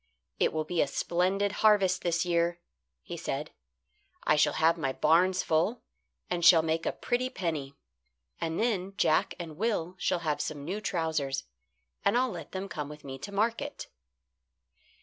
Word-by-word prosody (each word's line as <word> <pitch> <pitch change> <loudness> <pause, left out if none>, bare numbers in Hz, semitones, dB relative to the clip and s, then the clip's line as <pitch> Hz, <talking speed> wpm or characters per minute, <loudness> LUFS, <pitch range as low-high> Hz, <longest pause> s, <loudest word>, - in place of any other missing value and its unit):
"It - - +3
will 155 0 -1
be 165 +2 0
a - - +2
splendid 185 +7 0
harvest 195 -4 +4
this 170 0 0
year," 170 0 +1 0.4
he - - -6
said. - - -4 0.7
"I 155 - +4
shall 150 - +3
have 165 +1 +3
my 145 -6 -1
barns 180 +6 +3
full, 170 +10 +1 0.4
and 175 -1 -2
shall 165 -2 +8
make 160 +1 -1
a - - +2
pretty 250 +1 -1
penny. 155 - -3 0.6
And 165 0 -2
then 195 -4 0
Jack 155 -1 +2
and 160 -3 -7
Will 190 -5 -1
shall 175 - 0
have 150 -1 0
some 145 -1 -4
new 195 +6 -3
trousers, 160 -8 -1 0.6
and 200 +4 +3
I'll 255 -1 +2
let 165 -5 -8
them 190 +1 -4
come 150 -6 -5
with 150 0 -11
me 135 -1 -7
to 200 - -7
market." 220 +3 -2
170 Hz, 165 wpm, -29 LUFS, 155-195 Hz, 0.7 s, shall